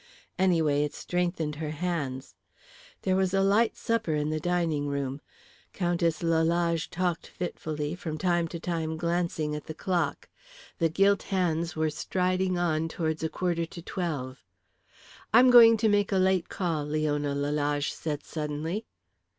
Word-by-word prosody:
Anyway, 160 -6 +3
it 150 - -3
strengthened 175 -4 -2
her 155 -1 -3
hands. 150 -5 -3 0.7
There 185 -1 +2
was 190 0 +1
a 195 - +3
light 210 +4 +3
supper 225 -9 0
in 150 +1 -1
the 155 - -1
dining 165 -3 0
room. 140 0 -3 0.5
Countess 170 -3 0
Lalage 165 0 +1
talked 175 -1 -2
fitfully, 155 -4 -4
from 165 -3 -5
time 175 0 +1
to 170 +1 -6
time 160 -2 -2
glancing 170 -2 -1
at 150 - -7
the 155 - -6
clock. 170 -4 -1 0.5
The 165 -1 +3
gilt 195 +4 +3
hands 170 -3 0
were 155 0 0
striding 185 +3 0
on 165 -2 +1
towards 160 -1 -2
a 160 - -1
quarter 170 -2 -1
to 170 - -10
twelve. 145 -9 -4 0.9
"I'm 250 +2 +7
going 230 -2 +9
to 220 +1 +2
make 205 -1 +2
a 195 - +2
late 185 -1 +2
call?" 165 -5 -1
Leona 145 -1 0
Lalage 145 0 0
said 150 -2 -4
suddenly. 155 +6 -4
165 Hz, 150 wpm, -28 LUFS, 150-180 Hz, 0.9 s, going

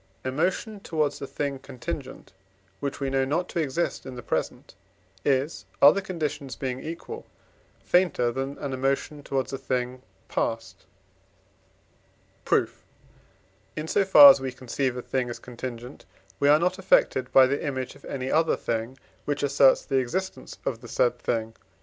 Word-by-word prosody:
Emotion 180 - -1
towards 155 -6 -1
a 140 - -4
thing 140 -1 -3
contingent, 135 - -7 0.5
which 140 -1 -4
we 135 -1 -2
know 135 0 +2
not 160 +7 -1
to - - -3
exist 160 +2 -1
in 130 -1 -8
the 120 - -8
present, - - -3 0.5
is, 140 +3 0
other 150 +8 +7
conditions 150 -8 -4
being 130 -1 -3
equal, 170 - -7 0.6
fainter 175 -10 +2
than 135 +3 -4
an 140 -2 -4
emotion 135 +3 -1
towards 135 -1 -2
a 135 - -3
thing 125 -1 -2 0.3
past. 115 -5 -3 1.6
Proof. - - 0 0.9
In 155 +1 -4
so 200 - +2
far 275 +9 +10
as - - 0
we 130 -1 -3
conceive 130 0 -2
a 125 - -5
thing 130 -2 -1
as 120 - -5
contingent, 125 +1 -8 0.3
we 140 - +3
are 150 - +7
not 180 +3 0
affected 130 -8 +2
by 130 - +8
the 140 +2 -1
image 130 -3 -3
of - - -18
any 130 -1 -4
other 160 +1 +3
thing, 115 +3 -3 0.3
which 145 0 -2
asserts 140 -1 +4
the 135 - 0
existence 185 +10 -4
of 115 -3 -2
the 120 - -10
said 120 +1 +1
thing 115 -2 -1
(IV. - - -21
135 Hz, 160 wpm, -26 LUFS, 125-155 Hz, 1.6 s, far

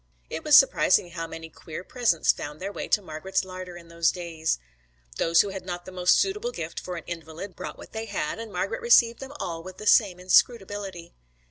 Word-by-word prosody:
It - - -4
was - - +8
surprising 175 - +4
how 165 -1 -4
many 165 0 -8
queer 160 +1 -9
presents 225 -8 +2
found 150 +1 -7
their 195 +2 -4
way - - -5
to 205 - +2
Margret's 180 +4 -2
larder 185 -1 -8
in 170 -1 -13
those 170 0 +2
days. 165 - -2 0.6
They 165 - 0
who 205 - +4
had 190 -1 -6
not 175 -1 -6
the 185 - -9
most 180 -1 +3
suitable 420 +5 0
gift - - -5
for 180 - -6
an 165 - -6
invalid 165 +3 -7
brought - - -7
what - - -12
they 220 0 -4
had, 205 +1 -3
and 225 -2 -7
Margret - - -2
received 235 - +5
them 270 +1 -8
all 165 -1 -4
with 185 +2 -10
the 215 - -8
same 200 -4 +4
inscrutability. 195 -2 +1
185 Hz, 210 wpm, -26 LUFS, 170-205 Hz, 0.6 s, was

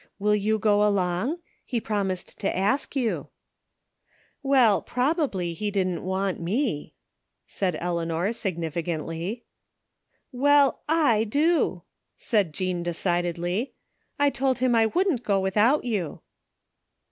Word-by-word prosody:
Will 210 +1 +2
you 215 +1 +1
go 210 0 +3
along? 200 - +1 0.3
He 240 - -2
promised 200 -4 -3
to - - -1
ask 205 +10 0
yott" 245 -5 -1 0.6
" - - -46 0.3
Well, 260 -7 +4
probably 250 - -1
he 205 +5 -3
didn't 185 -3 -1
want 190 0 -1
me," 180 - -2 0.5
said 180 -5 -2
Eleanor 170 +3 -1
significantly. 170 +1 -3 0.4
" - - -48
Well, 280 +1 +3 0.2
/ 225 -5 +3
do," 315 +7 +1 0.3
said 205 -8 0
Jean 180 +2 -2
decidedly. 175 +4 -1 0.2
" - - -46
I 285 0 +3
told 265 -1 0
him 255 -1 +2
I 225 -1 +4
wouldn't 345 - +1
go 200 -5 +1
without 210 +9 +2
you." 200 -11 -3
205 Hz, 125 wpm, -25 LUFS, 175-250 Hz, 0.6 s, Well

